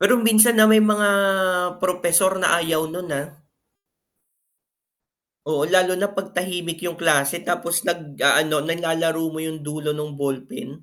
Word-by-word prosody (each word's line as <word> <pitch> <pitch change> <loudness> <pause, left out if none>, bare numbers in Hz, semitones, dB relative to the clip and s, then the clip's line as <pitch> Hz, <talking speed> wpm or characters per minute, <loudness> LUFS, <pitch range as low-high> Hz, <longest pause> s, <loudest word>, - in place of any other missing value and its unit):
Pero 200 +6 +4
minsan, 225 +2 +6
ah, 215 - +6
may 220 0 +6
mga 210 -1 +2 0.7
propesor 180 +1 +2
na 180 - +2
ayaw 165 -1 -1
'nun, 175 +2 -7
ah. 145 - -7 2.2
Oo, 150 -2 -1
lalo 185 0 +3
na 200 - 0
'pag 195 0 -4
tahimik 175 -2 -4
'yung 170 - -4
klase 150 -1 +2
tapos 170 0 -2
nag-aano, 155 -2 +1
nalalaro 165 -1 -1
mo 160 - -6
'yung 160 0 -6
dulo 150 0 -4
ng 150 0 -5
ballpen. 135 -2 -5
170 Hz, 140 wpm, -21 LUFS, 155-185 Hz, 2.2 s, minsan